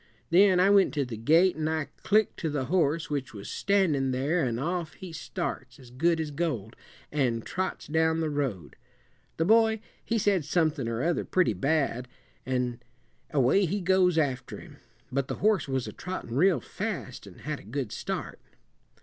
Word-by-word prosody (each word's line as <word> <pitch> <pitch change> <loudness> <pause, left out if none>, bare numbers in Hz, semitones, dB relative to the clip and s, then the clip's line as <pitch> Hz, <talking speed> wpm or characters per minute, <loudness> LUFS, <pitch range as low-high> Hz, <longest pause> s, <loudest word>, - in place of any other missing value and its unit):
Then 185 +1 +6
I 190 +2 +5
went 200 -5 +4
to 140 -2 +1
the 120 -2 -6
gate, 165 - +4
and 155 0 -1
I 155 -3 -2
clicked 215 +1 +2
to 160 - -1
the 145 -3 -2
horse 160 0 +1
which 135 -5 -3
was 100 0 -7
standin' 175 -10 +1
there, 140 +7 0
an' 120 -3 -1
off 165 +3 -2
he 180 -3 -9
starts, 155 -7 -5
as 125 -3 -15
good 165 +6 +1
as 155 -2 -3
gold, 135 - -3 0.4
an' 125 -6 0
trots 185 0 -3
down 160 +1 +1
the 160 -2 -1
road. 125 - -3 0.6
The 165 - +1
boy, 220 +2 +4 0.2
he 230 - 0
said 200 -5 +2
somethin' 155 -4 0
or 115 +3 -2
other 170 +1 +1
pretty 185 -11 +2
bad 135 - 0 0.4
an' 125 -2 -1 0.5
away 145 +8 +3
he 195 +5 -1
goes 180 -2 +3
after 135 -5 -1
him; - - -13 0.3
but 135 0 -1
the - - -3
horse 210 -5 +2
was 130 -2 -2
a - - -7
trottin' 180 -10 -6
real 175 +1 +4
fast, - - -5
an' - - -13
had - - -5
a - - -14
good 125 +2 -4
start." - - -4
155 Hz, 180 wpm, -28 LUFS, 130-180 Hz, 0.6 s, Then